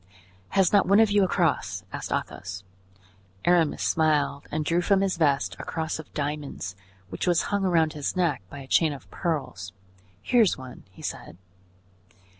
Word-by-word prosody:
"Has 190 Hz, -1 st, +4 dB
not 205 Hz, -, +5 dB
one 200 Hz, +3 st, +5 dB
of 220 Hz, -2 st, +5 dB
you 205 Hz, -1 st, +4 dB
a -, -, +3 dB
cross?" -, -, 0 dB
asked -, -, -5 dB
Athos. 95 Hz, +1 st, -4 dB, 0.8 s
Aramis 170 Hz, -3 st, +3 dB
smiled 150 Hz, -3 st, +1 dB
and 155 Hz, 0 st, -1 dB
drew 170 Hz, +3 st, +2 dB
from 195 Hz, +2 st, +3 dB
his 195 Hz, -1 st, +1 dB
vest 140 Hz, -, +1 dB
a -, -, -5 dB
cross 160 Hz, -1 st, -3 dB
of 160 Hz, -, -10 dB
diamonds, 145 Hz, -10 st, -4 dB, 0.3 s
which 90 Hz, -, -4 dB
was 175 Hz, -2 st, +3 dB
hung 200 Hz, -1 st, +1 dB
around 165 Hz, -4 st, +2 dB
his 145 Hz, +3 st, -3 dB
neck 170 Hz, -, +1 dB
by 140 Hz, -, -8 dB
a 135 Hz, -, -11 dB
chain 155 Hz, +2 st, +3 dB
of 135 Hz, -, -11 dB
pearls. 130 Hz, -, -3 dB, 0.5 s
"Here 245 Hz, -, +4 dB
is 210 Hz, -, +3 dB
one," 130 Hz, -2 st, -11 dB
he 95 Hz, -, -15 dB
said. -, -, -6 dB
155 Hz, 175 wpm, -26 LUFS, 140-180 Hz, 0.8 s, not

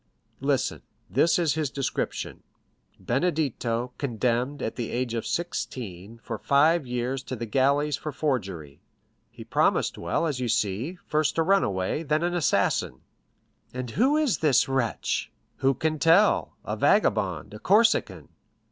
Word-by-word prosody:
"Listen; -, -, 0 dB, 0.3 s
this 170 Hz, -, +3 dB
is 165 Hz, -4 st, +2 dB
his 155 Hz, -3 st, -1 dB
description: 135 Hz, -1 st, -3 dB, 0.6 s
'Benedetto, 125 Hz, -5 st, -1 dB
condemned, 125 Hz, +1 st, -1 dB
at 110 Hz, -, -3 dB
the 120 Hz, -3 st, -4 dB
age 120 Hz, -1 st, -2 dB
of 115 Hz, -2 st, -3 dB
sixteen, 115 Hz, -, -4 dB
for 115 Hz, -, -5 dB
five 150 Hz, +1 st, +3 dB
years 125 Hz, +2 st, -2 dB
to 130 Hz, -, -6 dB
the 120 Hz, 0 st, -5 dB
galleys 140 Hz, +5 st, +2 dB
for 155 Hz, -, -5 dB
forgery.' 95 Hz, -, -3 dB, 0.5 s
He -, -, -11 dB
promised -, -, +1 dB
well, -, -, -1 dB
as 145 Hz, -5 st, -2 dB
you 125 Hz, -, -1 dB
see—first 120 Hz, -, -1 dB
a 165 Hz, -, +3 dB
runaway, 150 Hz, -, +1 dB
then 155 Hz, +1 st, 0 dB
an 175 Hz, 0 st, 0 dB
assassin." 175 Hz, -3 st, +1 dB, 0.7 s
"And 125 Hz, -2 st, -4 dB
who 265 Hz, -, +3 dB
is 285 Hz, -, +1 dB
this 150 Hz, -5 st, +3 dB
wretch?" 135 Hz, -4 st, -1 dB, 0.3 s
"Who 135 Hz, 0 st, +2 dB
can 155 Hz, +3 st, -1 dB
tell?—a 165 Hz, +7 st, +3 dB
vagabond, -, -, +1 dB
a -, -, -8 dB
Corsican." 225 Hz, +3 st, +2 dB
135 Hz, 135 wpm, -26 LUFS, 120-160 Hz, 0.7 s, this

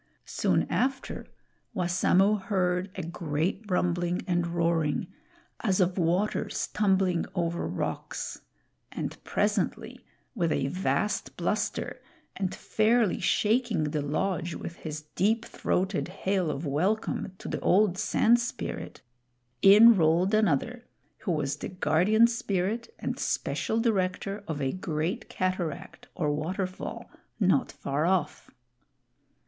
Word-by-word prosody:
Soon -, -, +1 dB
after, 265 Hz, +1 st, -2 dB, 0.5 s
Wassamo 185 Hz, +3 st, +3 dB
heard 185 Hz, -2 st, 0 dB
a 185 Hz, -, -4 dB
great 165 Hz, +3 st, -2 dB
rumbling 175 Hz, -1 st, 0 dB
and 175 Hz, -1 st, +1 dB
roaring, 170 Hz, -1 st, 0 dB, 0.5 s
as 195 Hz, -4 st, +1 dB
of 180 Hz, -1 st, +2 dB
waters 180 Hz, +5 st, 0 dB
tumbling 190 Hz, -4 st, +2 dB
over 170 Hz, -1 st, -1 dB
rocks; -, -, -4 dB, 0.5 s
and -, -, -5 dB
presently, -, -, -1 dB, 0.3 s
with 175 Hz, -9 st, 0 dB
a 135 Hz, -, 0 dB
vast 190 Hz, +5 st, -1 dB
bluster, -, -, -2 dB, 0.3 s
and 190 Hz, -2 st, -2 dB
fairly 220 Hz, -1 st, +2 dB
shaking 225 Hz, -4 st, +2 dB
the 150 Hz, -1 st, -1 dB
lodge 170 Hz, +3 st, -1 dB
with 170 Hz, -, -7 dB
his 155 Hz, -1 st, -6 dB
deep 220 Hz, +5 st, +1 dB
throated 190 Hz, 0 st, -1 dB
hail 185 Hz, -1 st, -1 dB
of 150 Hz, +2 st, -3 dB
welcome 185 Hz, +7 st, -1 dB
to -, -, -9 dB
the -, -, -3 dB
old 195 Hz, -1 st, +3 dB
Sand 225 Hz, +3 st, +3 dB
Spirit, 240 Hz, 0 st, -5 dB, 0.6 s
in 220 Hz, +4 st, +9 dB
rolled 175 Hz, +3 st, +3 dB
another, 215 Hz, -, +1 dB, 0.4 s
who 195 Hz, -, -2 dB
was 145 Hz, -4 st, -1 dB
the -, -, -5 dB
Guardian 185 Hz, +6 st, +3 dB
Spirit 230 Hz, -, -1 dB
and -, -, -4 dB
special 220 Hz, -, -1 dB
director 200 Hz, -2 st, 0 dB
of 155 Hz, -3 st, -3 dB
a 135 Hz, -, +1 dB
great 175 Hz, +4 st, -3 dB
cataract 185 Hz, -4 st, -3 dB
or 150 Hz, -5 st, 0 dB
water 180 Hz, +6 st, -2 dB
fall 185 Hz, 0 st, -7 dB, 0.3 s
not -, -, +2 dB
far 145 Hz, +4 st, -1 dB
off. 180 Hz, -5 st, 0 dB
185 Hz, 120 wpm, -28 LUFS, 165-210 Hz, 0.6 s, in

